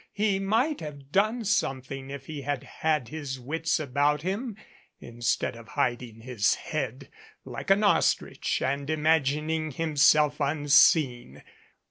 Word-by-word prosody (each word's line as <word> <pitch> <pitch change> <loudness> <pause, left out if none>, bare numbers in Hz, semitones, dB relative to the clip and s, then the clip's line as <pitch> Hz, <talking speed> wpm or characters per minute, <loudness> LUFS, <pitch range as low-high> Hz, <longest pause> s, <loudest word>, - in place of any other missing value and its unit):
He 205 -2 +1
might 230 +10 +1
have 145 -2 -9
done 215 +6 +1
something 135 -8 -2
if 140 -1 -8
he 150 -1 -6
had 140 -1 -3
had 150 -2 -1
his 145 -4 -5
wits 160 +7 -1
about 145 +1 0
him, 205 +4 -3 0.4
instead 120 0 -2
of 115 -1 -12
hiding 120 -2 -2
his 115 -4 +1
head 135 -5 -5 0.3
like - - -7
an 195 +2 +4
ostrich 205 - +1
and 140 +2 -2
imagining 155 0 +1
himself 150 0 +3
un 145 +1 -1
seen. 125 - +4
145 Hz, 130 wpm, -27 LUFS, 130-160 Hz, 0.4 s, an